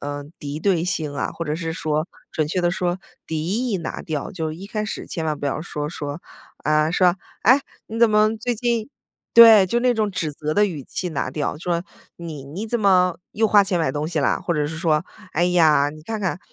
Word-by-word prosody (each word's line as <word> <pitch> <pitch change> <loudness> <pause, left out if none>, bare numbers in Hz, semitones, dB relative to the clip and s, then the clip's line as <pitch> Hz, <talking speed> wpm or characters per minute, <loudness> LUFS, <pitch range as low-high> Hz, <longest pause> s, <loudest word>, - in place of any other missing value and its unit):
嗯， 145 +1 -6
敌 145 +1 -5
对 175 -1 +1
性 155 -5 -2
啊， - - -2
或 165 - -5
者 150 -1 -2
是 165 0 -3
说 155 +1 -1 0.2
准 155 -1 0
确 180 - 0
地 175 0 +2
说 180 0 -1 0.3
敌 160 0 -3 0.2
意 210 - 0
拿 165 - -5
掉。 150 -3 -4
就 160 -5 -3
一 180 +5 -9
开 215 +1 -3
始 - - -5
千 165 - -4
万 155 -2 -1
不 - - -3
要 140 +2 -2
说 150 -3 -4
说， 145 0 -5 0.4
啊， 155 +1 +3
说： 180 0 +4 0.3
“哎， 255 +7 +6 0.3
你 225 +1 -6
怎 235 -2 +6
么 215 +1 +3
最 245 +3 -2
近……” 235 +1 -1 0.5
对， 225 -4 +10
就 235 +6 0
那 250 0 +3
种 215 -2 0
指 165 -5 -2
责 150 +1 -3
的 210 - +4
语 165 -8 -3
气 180 +7 -4
拿 140 -4 -2
掉， 145 +1 -3
说， 170 +1 -1 0.3
“你 160 -5 -7
你 165 +11 -6
怎 235 +1 -1
么 180 -4 +3
又 220 +1 +2
花 205 -1 +6
钱 190 -2 0
买 155 -5 0
东 150 +1 -2
西 165 - -2
了？ 140 - +1
“或 175 - -1
者 150 -1 0
是 160 +1 -5
说，” 160 -1 +1 0.3
哎 170 - +3
呀， 160 -5 +4
你 155 +1 -12
看 220 +7 -4
看……“ 190 -3 -2
170 Hz, 245 characters per minute, -22 LUFS, 150-200 Hz, 0.5 s, 对